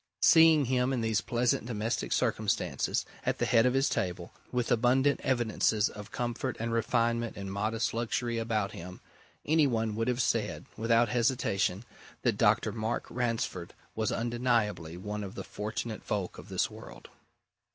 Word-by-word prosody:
Seeing 160 -3 +7
him 125 +1 +1
in 125 - 0
these 110 -2 +1
pleasant 120 -1 0
domestic 115 0 -2
circumstances, - - 0 0.2
at - - 0
the - - 0
head 115 0 +4
of 125 - +1
his 135 +1 +3
table, 90 -1 -2 0.2
with 125 -1 -1
abundant 130 +4 +3
evidences 115 -4 +1
of 105 0 -10
comfort 120 +1 -3
and 115 +1 -2
refinement 115 0 0
and 100 -1 -5
modest 110 +2 -1
luxury 115 0 -1
about 110 -3 -1
him, 90 +2 -9 0.5
any 155 -1 +4
one 115 -3 0
would 115 +2 -1
have 125 -1 0
said, 110 -2 -1
without 115 +1 +3
hesitation, 115 -4 0 0.4
that - - +2
Dr. - - +3
Mark 110 +1 -2
Ransford 115 -8 -2 0.2
was 110 0 -1
undeniably 115 -8 0
one 105 +3 -4
of 95 -1 -7
the - - -5
fortunate 110 +1 -5
folk 100 -4 -3
of - - -12
this - - +1
world. - - -12
115 Hz, 155 wpm, -30 LUFS, 105-120 Hz, 0.5 s, Seeing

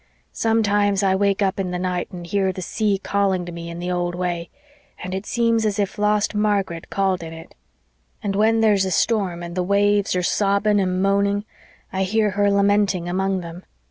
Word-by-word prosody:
Sometimes 205 -3 +1
I 190 -1 +3
wake 200 +1 +1
up 195 0 0
in 190 -2 -1
the 180 - -3
night 180 -1 -2
and 175 -1 -8
hear 190 +2 0
the 185 0 -6
sea 210 +1 0
calling 195 -2 0
to 175 - -7
me 170 0 -7
in 170 - -7
the 175 +1 -3
old 175 -1 -1
way, 175 -1 -3 0.5
and 185 - -5
it 190 +2 -4
seems 230 -1 +1
as 210 -1 0
if 200 -1 -2
lost 210 0 +1
Margaret 200 -5 -1
called 190 -2 0
in 165 -1 -7
it. 165 0 -12 0.7
And 195 -1 -1
when 225 +2 +3
there's 210 -3 +4
a 190 - -1
storm 185 -2 0
and 170 0 -6
the 180 - -1
waves 200 +1 +2
are 180 - 0
sobbing 200 +2 +2
and 185 -1 0
moaning 200 +1 +1 0.5
I 190 - -1
hear 210 +2 +1
her 205 +1 +2
lamenting 200 -2 +2
among 190 +1 -1
them. 170 +1 -9
195 Hz, 200 wpm, -22 LUFS, 180-205 Hz, 0.7 s, there's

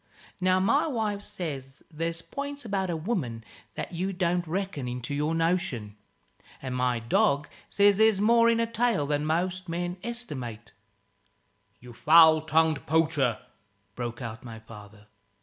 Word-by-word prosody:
Now 185 0 +3
my 255 +12 +2
wife 215 -7 -2
says 145 -10 -7
there's 165 +1 -3
points 285 -1 -6
about 195 -3 -1
a 170 - -1
woman 155 - -3 0.3
that - - -5
you 185 +3 -2
don't 175 -1 0
reckon 180 -6 -3
into 125 +2 -5
your 150 +3 0
notion; 165 - -1 0.6
and 130 -1 -5
my 125 -1 +1
dog 140 +5 +1 0.2
says 200 -1 +4
there's 220 -2 +4
more 230 +2 +5
in 230 0 +2
a 230 - +2
tail 230 -8 0
than 145 +1 -1
most 180 +3 -1
men 175 +2 -3
estimate 135 - -6 0.5
" - - -43
"You 125 0 -12
foul 160 +4 +6
tongued 160 -1 +1
poacher 150 -7 +1 0.3
" 100 0 -43
broke 120 0 -5
out 115 -1 -7
my 115 -2 -9
father. 105 -2 -14
165 Hz, 150 wpm, -27 LUFS, 125-195 Hz, 0.6 s, foul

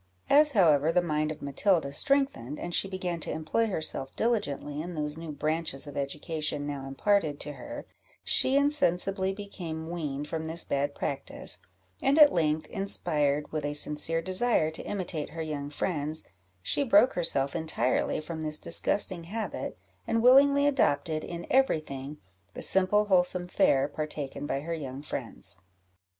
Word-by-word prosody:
As, 295 +1 +6
however, 160 - +4
the 180 - +3
mind 155 -2 0
of 155 - -8
Matilda 145 +1 +1
strengthened, 150 - +1
and 175 - -5
she 195 - +1
began 185 -3 -3
to - - -3
employ 160 +9 0
herself 155 -8 -3
diligently 150 - -1
in 175 +1 -6
those 150 -1 -2
new 165 -1 -7
branches 155 -1 -2
of 145 - -9
education 150 +1 -2
now 140 -2 -5
imparted 155 +1 +1
to 150 - -2
her, 295 - -8 0.4
she 265 - +3
insensibly 195 - +2
became 170 -5 -6
weaned 150 -4 -4
from 160 +1 -4
this 165 +1 -6
bad 140 +1 -1
practice; 140 -1 -3 0.4
and 275 +2 +3
at 300 -2 +8
length, 155 -2 +1
inspired 150 -7 +1
with 155 -1 -3
a 145 0 -2
sincere 150 +3 +4
desire 185 -3 +1
to 160 - -5
imitate 180 -6 -3
her 165 - -6
young 145 -2 -4
friends, 155 0 -2 0.4
she 285 - +1
broke 275 0 +5
herself 140 -5 0
entirely 160 -5 0
from 160 +1 -6
this 155 -1 0
disgusting 175 +1 0
habit, 215 +5 -5 0.3
and 230 0 +1
willingly 280 +3 +6
adopted, 160 - +1
in 170 0 -6
every 265 -10 +4
thing, 140 0 -8 0.4
the - - -3
simple 190 +2 +3
wholesome 180 -2 +2
fare 140 -6 +2
partaken 145 -1 -5
by 135 - -2
her 165 +3 -4
young 140 -3 -6
friends. 95 - -5
160 Hz, 155 wpm, -28 LUFS, 145-195 Hz, 0.4 s, at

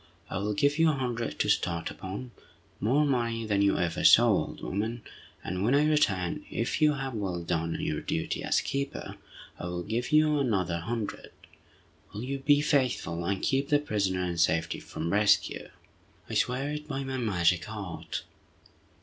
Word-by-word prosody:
I 95 - -2
will 105 +1 -1
give 145 +7 +2
you 165 0 +5
a - - +2
hundred 120 -4 -3
to - - 0
start 85 -1 0
upon—more 120 +5 -3
money 115 -4 0
than 100 -2 +1
you 100 0 +3
ever 85 -2 -1
saw, - - +8
old - - 0
woman, 110 +4 -3 0.4
and 90 +1 -3
when 120 +6 +3
I 145 +1 +4
return, 95 - +1
if 115 +7 -2
you 150 -1 +5
have 135 -2 -4
well 95 -6 -3
done 85 -1 -1
your - - -2
duty - - -2
as - - +1
keeper, 140 0 -4 0.4
I - - -5
will 90 0 -3
give 115 - -2
you 150 -1 +4
another 95 -10 0
hundred. 110 +4 -4 0.8
Will 105 - -4
you 135 +2 -3
be 145 +1 +4
faithful 130 - 0
and 95 +1 -1
keep 135 +1 +1
the 145 - +5
prisoner 100 -10 -1
in 85 -1 -2
safety 80 0 +1
from 85 +3 -4
rescue?" 100 -2 +2 0.6
"I - - -7
swear 135 +4 0
it 150 0 -5
by 135 -2 -3
my 135 0 -3
magic 90 -6 +1
art!" 100 -6 -5
110 Hz, 170 wpm, -29 LUFS, 90-135 Hz, 0.8 s, saw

